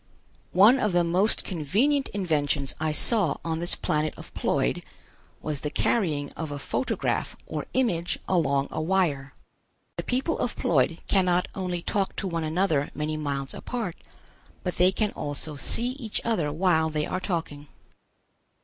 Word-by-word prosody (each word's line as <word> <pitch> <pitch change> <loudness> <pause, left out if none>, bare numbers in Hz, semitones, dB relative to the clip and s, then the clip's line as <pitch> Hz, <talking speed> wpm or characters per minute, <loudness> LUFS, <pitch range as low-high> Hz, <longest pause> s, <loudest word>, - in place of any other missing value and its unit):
One 215 +8 +7
of 210 -5 +1
the 175 0 +4
most 180 +6 +2
convenient 215 - +1
inventions 150 -7 0
I 155 0 +1
saw 180 - +2
on 165 -1 -1
this 175 +1 +1
planet 155 0 0
of - - -11
Ploid - - 0 0.6
was 150 -2 -3
the 150 - -2
carrying 150 -6 0
of 160 -2 -5
a 145 - -4
photograph 145 - -1
or - - -4
image 180 -9 +1
along 140 -6 +2
a - - -2
wire. 155 -6 0 0.6
The - - -2
people 265 +6 0
of 240 - -1
Ploid 160 +1 +2
cannot 180 -2 +2
only 180 -2 -3
talk 195 -2 0
to 195 - -2
one 165 -2 -2
another 155 -2 +1
many 155 +1 -2
miles 140 -3 -3
apart, 225 -9 -4 0.7
but 180 - -3
they 180 +1 +5
can 210 +2 0
also 145 +1 -3
see 235 - -2
each 255 -5 -3
other 175 -11 +1
while 160 -1 +2
they 150 -1 -1
are 185 - -2
talking. 160 -6 -3
170 Hz, 155 wpm, -27 LUFS, 150-195 Hz, 0.7 s, One